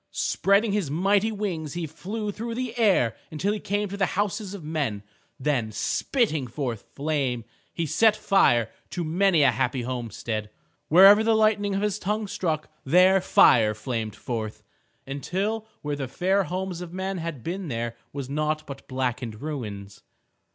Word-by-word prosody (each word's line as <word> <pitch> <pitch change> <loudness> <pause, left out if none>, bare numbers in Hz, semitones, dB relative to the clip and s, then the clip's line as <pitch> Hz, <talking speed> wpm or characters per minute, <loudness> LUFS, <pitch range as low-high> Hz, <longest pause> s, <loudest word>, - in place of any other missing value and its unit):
Spreading 200 +2 +2
his 200 -7 0
mighty 195 +7 +2
wings, 180 -8 -3
he 175 -1 -3
flew 205 +7 -5
through 230 +3 -5
the 250 -1 -3
air 195 - +3
until 185 +7 -1
he 215 - -3
came 205 +1 -1
to 200 - -5
the 195 -2 +2
houses 205 0 -1
of 185 - -9
men. 145 -10 -2 0.4
Then 130 -6 0
spitting 140 - 0
forth 120 -3 -4
flame, 140 -6 -1 0.3
he 170 - -2
set 215 +8 +4
fire 135 - +3 0.2
to 175 - -3
many 170 0 +3
a 135 - +6
happy 125 +1 -1
homestead. 115 -3 -4 0.4
Wherever 195 +6 +8
the 225 0 +3
lightning 210 -2 +2
of 200 - -1
his 210 -1 0
tongue 210 +3 -1
struck, 175 -6 -2 0.2
there 185 +6 +5
fire 110 -10 +5
flamed 110 -1 -3
forth, 110 -3 -5 0.4
until 195 +11 -2 0.2
where 145 -1 -2
the 135 -2 -4
fair 185 +8 +1
homes 185 0 -4
of 175 -2 -7
men 190 +1 -3
had 165 -7 -5
been 185 +2 -4
there 115 -3 -3 0.2
was 140 -2 -5
naught 155 +2 -1
but 135 -1 -9
blackened 125 -4 -3
ruins. 105 -9 -6
160 Hz, 160 wpm, -26 LUFS, 130-200 Hz, 0.4 s, Wherever